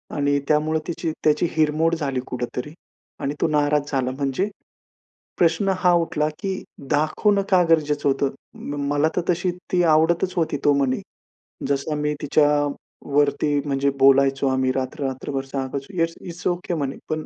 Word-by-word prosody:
आणि 145 -1 +1
त्यामुळं 155 +1 +2
तिची 165 -1 -2
त्याची 150 +2 +3
हिरमोड 160 +2 +2
झाली 140 -5 -2
कुठेतरी 125 +4 -4 0.5
आणि 140 - -1
तो - - +3
नाराज 150 -1 +1
झाला 130 -2 0
म्हणजे. 140 +9 -1 0.9
प्रश्न 175 +4 +3
हा 180 -1 +4
उठला 150 -2 0
की 195 -2 -3 0.3
दाखवणं 200 +7 +2
का 185 -2 +5
गरजेचं 150 -3 +2
होतं, 135 0 +1 0.6
मला 145 +2 +2
तर - - +3
तशी 175 +1 0 0.2
ती 180 -1 +3
आवडतच 170 +4 +2
होती 160 -3 0
तो 145 - +5
म्हणे. 135 -2 +1 0.7
जसं 140 +2 -1
मी 150 0 0
तिच्यावरती 145 0 +1
म्हणजे 140 -1 +1
बोलायचो, 135 0 +4
आम्ही 130 0 +1
रात्र, 135 +3 -3
रात्रभर 135 +1 -3
सांगायचो 135 +4 -5
येस, 165 0 +1
इट्स 175 0 -6
ओके 175 0 -1
म्हणे, 140 -4 -2
पण 155 0 -2
150 Hz, 145 wpm, -23 LUFS, 140-165 Hz, 0.9 s, का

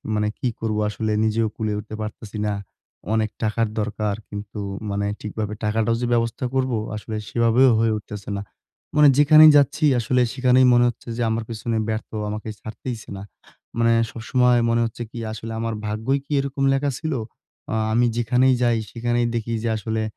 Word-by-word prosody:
মানে 105 0 +1
কি - - -1
করবো? 110 -1 -1
আসলে 110 +1 -2
নিজেও 110 +1 +1
কুলে 110 -1 -2
উঠতে 110 +1 -8
পারতেছি 110 0 -7
না। 105 - 0 0.6
অনেক 110 -1 +1
টাকার 110 +1 +1
দরকার। 105 -1 -1
কিন্তু 105 0 -7 0.3
মানে 100 0 -1 0.2
ঠিকভাবে 105 0 -4
টাকাটাও 110 +2 +1
যে - - 0
ব্যবস্থা 115 +2 0
করবো 130 -3 +1 0.2
আসলে, 110 +1 -6
সেভাবেও 120 +2 +4
হয়ে 115 -1 +2
উঠতেছে 105 0 -8
না। 100 - -4 0.5
মানে 150 -1 +8
যেখানেই 155 +2 +8
যাচ্ছি 145 +2 +2
আসলে 125 +2 +1
সেখানেই 130 0 +4
মনে 120 0 +5
হচ্ছে 120 - -9
যে - - -2
আমার 110 +1 -1
পেছনে 115 0 -2
ব্যর্থ 110 0 -3 0.2
আমাকে 110 +1 -5
ছাড়তেইছে 110 +1 -7
না। 95 - -7 0.5
মানে 115 0 +4 0.2
সবসময় 125 +1 +2
মনে 115 0 +2
হচ্ছে 115 +1 -5
কি? 120 - -7
আসলে 110 +1 -6
আমার 115 0 -2
ভাগ্যই 110 +6 -1
কি - - -15
এরকম 140 0 -2
লেখা 140 +1 0
ছিল? 160 -1 -2 0.6
আ - - 0 0.2
আমি 120 +2 +3
যেখানেই 125 +3 +3
যাই, 120 -1 +3
সেখানেই 120 +1 0
দেখি 115 0 -2
যে 115 - 0
আসলে 110 +1 -2
115 Hz, 175 wpm, -23 LUFS, 110-125 Hz, 0.6 s, মানে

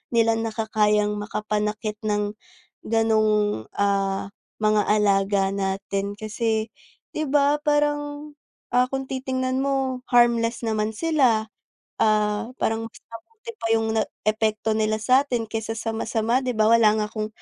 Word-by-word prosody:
nila 225 0 +3
nakakayang 215 -2 +1
makapanakit 210 0 -3
ng 205 0 0 0.6
ganong, 215 - +1
ah, 195 -1 0 0.3
mga 215 -1 +2
alaga 200 -1 +3
natin 195 +1 -3
kasi 220 0 -1 0.5
di 310 -3 -2
ba? 290 +1 +3
Parang, 295 0 -1 0.4
ah, 250 +1 +3
kung 270 0 -3
titingnan 260 0 -2
mo 270 -2 -1
harmless 235 -1 +3
naman 215 -1 0
sila, 260 -10 +2 0.6
ah, 210 0 +2
parang 225 0 -1
mas - - -19 0.2
mabuti 440 - -10
pa - - -2
yung 220 0 0 0.3
epekto 215 0 0
nila 215 0 +1
sa'tin 250 +1 +2
kaysa 225 0 -4 0.2
masama 225 +2 0
di 250 -3 -3
ba 220 +1 +4
wala 230 -2 +6
nga 215 - 0
akong 215 -1 -3
220 Hz, 125 wpm, -24 LUFS, 210-255 Hz, 0.6 s, wala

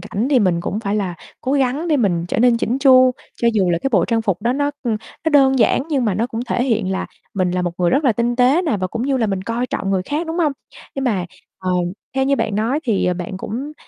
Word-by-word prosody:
cảnh 205 +5 -2
thì 270 - +5
mình 180 -6 +2
cũng 200 +4 -3
phải 200 -2 -2
là 190 -4 -2 0.3
cố 265 - -2
gắng 280 +4 0
để 305 - +3
mình 180 -9 +1
trở - - -1
nên 240 0 +4
chỉn 235 +2 -1
chu, 255 -2 +6 0.3
cho 235 - +5
dù 190 -4 +2
là 170 - +1
cái - - +1
bộ 185 -6 +4
trang 225 -1 0
phục 195 -2 -1
đó 235 +2 +1
nó 285 +2 0
nó 230 +7 -3
đơn 270 -3 +4
giản 235 +2 +3
nhưng 275 -6 0
mà 210 -4 +1
nó 220 +5 0
cũng 230 -2 -5
thể 245 0 0
hiện 220 -7 0
là 190 - -2 0.3
mình 185 -2 +1
là 180 0 -1
một 175 - -1
người 175 -1 +2
rất 285 +3 +2
là 255 - +4
tinh 235 +2 -1
tế 260 +7 +4
nè, 310 - 0
và 185 -1 -2
cũng 230 +5 -4
như 270 +1 +1
là 235 -3 +1
mình 195 -2 -2
coi 230 +4 -2
trọng 195 - -3
người 190 -2 +1
khác, 295 - -3
đúng 325 +2 -3
hông? 310 -4 +2 0.4
Nhưng 275 - -3
mà, 205 -8 0 0.3
ờ, 185 -1 -3 0.4
theo 265 0 +1
như 275 +1 +2
bạn 225 -4 -1
nói 230 +8 0
thì, 225 -6 +1
ờ, 180 - +1
bạn 180 +1 -5
cũng 255 +10 -5
235 Hz, 275 wpm, -19 LUFS, 195-265 Hz, 0.4 s, chu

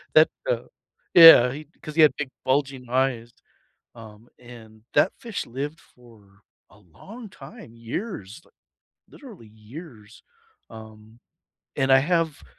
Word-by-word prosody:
that, - - +6 0.2
uh - - -1 0.5
yeah, 165 -8 +9
he 150 +3 -9 0.2
'cause 155 -1 -9
he 160 - +4
had 150 -4 +5
big 150 -3 -4 0.2
bulging 135 -2 -2
eyes, 125 -2 -1 0.6
um, 110 0 -15
and 115 -3 -15
that 190 - +3
fish 230 -4 -6
lived 145 +6 -7
for 105 -5 -23 0.3
a 105 - -21
long 200 - -14
time, 205 - -14
years, 115 - -7 0.7
literally 210 - -15
years. 110 0 -14 0.5
Um, 110 +1 -15 0.6
and 135 0 0
I 135 - +6
have, 165 0 -1
125 Hz, 125 wpm, -23 LUFS, 110-155 Hz, 0.7 s, yeah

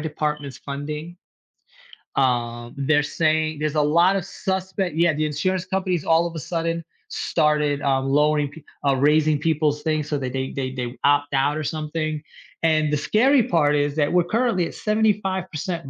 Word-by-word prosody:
department's 150 -3 -3
funding, 150 +4 -6 1.0
um, 120 -2 0
they're 145 +2 +2
saying 155 0 0
there's 155 0 -1
a 150 - +3
lot 170 +6 +4
of 190 -3 -2
suspect 190 -3 -3
Yeah, 170 -1 +3
the 155 +1 -1
insurance 175 +5 -1
companies 185 -3 -1
all 165 +1 +3
of 170 - -9
a - - -3
sudden 165 +2 -2 0.3
started, 150 -1 +1
uh, 135 -2 +1
lowering 145 +1 +2
pe 155 0 -13 0.2
uh, 135 - +4
raising 150 +2 +3
people's 150 -2 0
things 155 -2 -1
so 145 - 0
that 130 -2 -4
they 130 0 -2
they 130 -1 -3
they 125 -1 -5
opt 145 0 +2
out 145 +3 +2
or 155 - -3
something, 155 0 -3 0.4
and 155 -2 +2
the - - +3
scary 245 - +3
part 150 -5 +2
is 145 0 0
that 145 -2 +1
we're 180 -1 +3
currently 220 -3 +1
at - - -10
75% 190 -7 -1
155 Hz, 170 wpm, -23 LUFS, 145-170 Hz, 1.0 s, lot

